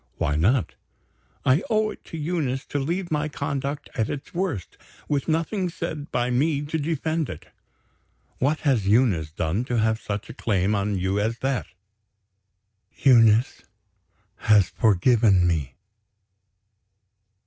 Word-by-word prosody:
"Why 75 - 0
not?" 105 - +2 0.7
"I 130 +7 +4
owe 215 -1 +2
it - - -13
to 165 - -8
Eunice 150 -5 -2
to 145 - -3
leave 170 +6 -2
my 150 0 0
conduct 140 0 -3
at 110 -3 -1
its 140 - -6
worst; 170 - -3 0.3
with 140 -2 -1
nothing 170 +4 0
said 160 -4 -6
by 120 0 0
me 145 +3 +1
to 155 +2 -3
defend 160 0 -1
it." 85 - -9 0.9
"What 145 +4 +1
has 125 -10 +1
Eunice 100 -9 +2
done 80 +8 -1
to 120 -1 -1
have 110 0 +1
such 105 0 -4
a - - -8
claim 100 -2 0
on 100 0 0
you 95 +2 0
as 110 +3 -1
that?" 135 -2 -1 1.3
"Eunice 115 -3 +4 0.8
has 105 -3 +4
forgiven 105 -2 +3
me." 75 -7 -1
125 Hz, 135 wpm, -24 LUFS, 105-150 Hz, 1.3 s, I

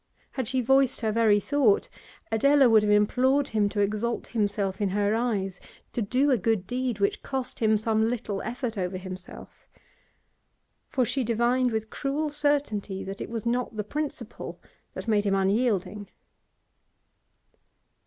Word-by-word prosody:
Had 260 -4 -3
she 255 +1 0
voiced 265 +1 +3
her 220 -2 0
very 215 -2 +4
thought, 260 -3 +2 0.4
Adela 280 +4 +5
would 225 -2 +6
have 210 0 +1
implored 260 +7 +3
him 210 -2 +1
to 205 0 -1
exalt 215 +4 -1
himself 205 -3 -1
in 200 - +1
her 205 +2 +1
eyes, 205 -5 -1 0.3
to 240 - -1
do 255 +7 +2
a 250 - +3
good 220 -2 0
deed 245 0 -2
which 200 - 0
cost 265 -1 -4
him 220 -2 +3
some 220 +1 +1
little 220 -5 -3
effort 235 -2 -4
over 185 0 -2
himself. 185 0 -10 1.2
For 255 -2 +1
she 265 +3 -1
divined 240 +2 +1
with 220 0 -3
cruel 295 +2 -2
certainty 285 -10 -1
that 195 +1 -7
it - - -5
was 230 -1 -5
not 240 -1 -1
the 210 - -2
principle 280 -1 -5 0.4
that - - -6
made 210 -2 +2
him 195 - +2
unyielding. 200 0 0
225 Hz, 155 wpm, -27 LUFS, 205-255 Hz, 1.2 s, would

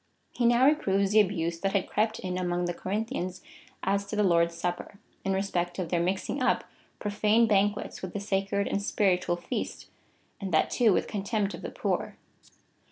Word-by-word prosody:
He 240 - +1
now 240 +2 +5
reproves 200 -10 +3
the 215 - +6
abuse 170 -5 +1
that 195 +2 -1
had 200 -2 +1
crept 215 +1 0
in 180 -1 -4
among 175 -1 -1
the 175 - -1
Corinthians 190 -1 -3 0.4
as 200 +1 +1
to - - -4
the 210 - +2
Lord's 170 -2 +3
Supper, 175 +3 -4 0.3
in 195 - 0
respect 180 -3 -1
of 180 -4 -3
their 175 - +1
mixing 190 +10 -1
up - - +2 0.3
profane 210 +2 +2
banquets 205 -1 +1
with 185 -2 -6
the 205 - -2
sacred 200 0 0
and - - 0
si)iritual 185 -3 +1
feast, - - -5 0.5
and 195 -2 -4
that 155 - +2
too 235 -4 +4
with - - +2
contemj)t 205 0 -1
of - - -8
the - - -5
poor. - - -2
195 Hz, 180 wpm, -28 LUFS, 180-210 Hz, 0.5 s, the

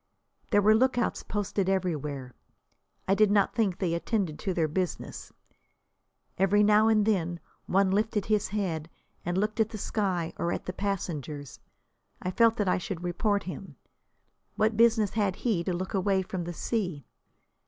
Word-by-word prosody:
There 205 0 +3
were 215 +2 +6
lookouts 245 +1 +2
posted 200 -2 -2
everywhere. 150 -9 -2 0.7
I 190 - +4
did 215 +1 +4
not 205 -1 +3
think 205 -6 +1
they 175 -4 -1
attended 170 -2 -1
to 195 - -2
their 165 -3 +1
business. 180 +2 -4 1.1
Every 200 +2 +4
now 210 +1 +5
and 215 -2 +4
then 175 -5 0 0.3
one 195 0 +3
lifted 210 0 +1
his 210 -1 +1
head 170 -6 -2 0.3
and 175 +1 -2
looked 215 +3 -1
at 220 -1 +3
the 220 - -6
sky 190 -5 -1
or 170 - -1
at - - -3
the 185 - -4
passengers. 155 - -4 0.6
I 185 - -3
felt 230 +3 +4
that 205 - 0
I 180 - +2
should 180 -1 -5
report 200 +4 0
him. 180 -3 -8 0.8
What 220 +1 +2
business 225 -2 +4
had 205 -4 0
he 205 -8 0
to - - 0
look 185 +3 -3
away 195 -1 +1
from 180 -2 -4
the 175 - -4
sea? 180 - -2
195 Hz, 165 wpm, -28 LUFS, 175-210 Hz, 1.1 s, were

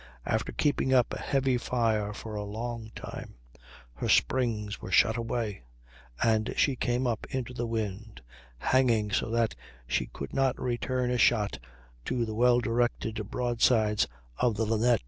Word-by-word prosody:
After - - -1
keeping 135 -3 +1
up 125 -2 +3
a - - -4
heavy 135 -2 +1
fire 110 -4 0
for 110 +1 -7
a 105 -1 -3
long 110 +2 -5
time - - -8 0.6
her - - -3
springs 110 -5 +1
were 95 - -7
shot 110 +3 +5
away, 115 - -2 0.6
and 110 0 +2
she 140 - +3
came 125 +1 0
up 115 -3 -1
into 125 -2 -3
the 120 -1 -3
wind, 110 - -4 0.4
hanging 115 - +2
so 100 - 0
that 115 -1 +1 0.3
she 60 - 0
could 70 - -8
not 135 -1 +1
return 125 0 -1
a 125 - 0
shot 105 -3 +3 0.5
to 120 -2 0
the 110 - -4
well 120 +2 +4
directed 115 -2 0
broadsides 115 -3 +2 0.3
of 120 -3 +2
the 110 +2 0
Linnet. 115 +2 +3
115 Hz, 155 wpm, -29 LUFS, 110-125 Hz, 0.6 s, shot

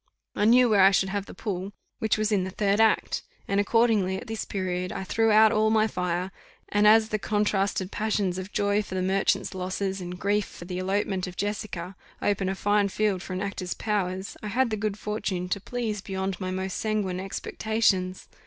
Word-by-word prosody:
I 210 - +1
knew 245 +3 +6
where 210 -4 +4
I 190 - +8
should 190 0 +2
have 200 0 -3
the - - -10
pull, 195 -1 -4 0.3
which 220 -1 +1
was 215 0 0
in 200 -3 +2
the 190 - -3
third 200 +2 +1
act, 220 -1 +2 0.3
and 200 0 +1
accordingly 205 -3 +2
at 220 - -8
this 225 -2 -4
period 180 -2 -2
I - - -4
threw 225 +4 +1
out 215 0 +6
all 215 -1 +3
my 220 0 +4
fire; 180 -2 -2 0.4
and 205 +1 +4
as 220 +1 +6
the 215 - -1
contrasted 200 -2 0
passions 205 -4 -1
of 185 +2 -7
joy 205 0 +1
for 195 -2 -7
the 185 - 0
merchant's 195 +1 +1
losses, 190 +1 -3
and 180 0 -6
grief 205 +2 +1
for 175 - -11
the 180 0 -4
elopement 190 0 -1
of 180 - -9
Jessica, 200 -3 -4 0.2
open 195 -2 0
a 190 - -1
fine 205 +1 +2
field 200 -2 0
for 185 - -6
an 185 - -3
actor's 195 -3 -3
powers, 190 -3 -2
I 215 - -5
had 240 +3 +1
the - - +1
good 210 -1 -2
fortune 210 -4 -3
to 200 +2 -1
please 220 -3 -3
beyond 190 -1 -3
my 185 - -2
most 190 0 -3
sanguine 210 -4 -1
expectations. 195 -1 -1
200 Hz, 205 wpm, -26 LUFS, 185-215 Hz, 0.4 s, I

